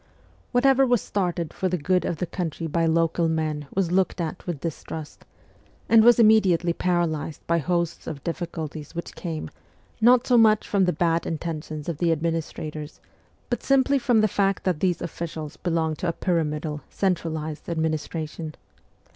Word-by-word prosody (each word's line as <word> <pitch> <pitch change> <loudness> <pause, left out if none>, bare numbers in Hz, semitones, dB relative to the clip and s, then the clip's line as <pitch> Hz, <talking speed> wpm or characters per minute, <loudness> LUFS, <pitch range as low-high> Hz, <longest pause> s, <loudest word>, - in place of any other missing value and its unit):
Whatever 270 +2 +4
was 245 -3 +3
started 175 -6 -2
for 185 - -1
the 180 - 0
good 180 +4 +1
of 170 - -2
the 180 - -1
country 165 -2 -4
by 165 +1 +1
local 165 +1 +2
men 155 -2 -2
was 185 -3 0
looked 190 0 +1
at 170 +2 -4
with 170 -5 -3
distrust, 160 -1 -6 0.6
and 225 -1 +6
was 240 +1 +7
immediately 195 -7 +4
paralysed 170 -4 -1
by 170 0 +2
hosts 170 +1 -1
of 145 -3 -6
difficulties 165 -3 -5
which 170 - -5
came, 165 -3 -5 0.5
not 245 +2 +6
so 245 -2 +5
much 215 -1 +4
from 195 -2 +2
the 180 - +2
bad 165 0 0
intentions 155 -2 -4
of 165 -3 -3
the 170 -2 +2
administrators, 155 -2 -3 0.5
but 240 - -2
simply 275 0 +3
from 240 -4 +3
the 215 - +4
fact 195 -1 0
that 180 -5 0
these 180 -1 0
officials 155 -2 -5
belonged 160 -3 -1
to 180 - -2
a 170 - 0
pyramidal, 155 -4 -1
centra 180 -4 0
lised 155 0 -5
administration. 160 -1 -3
170 Hz, 165 wpm, -25 LUFS, 155-190 Hz, 0.6 s, was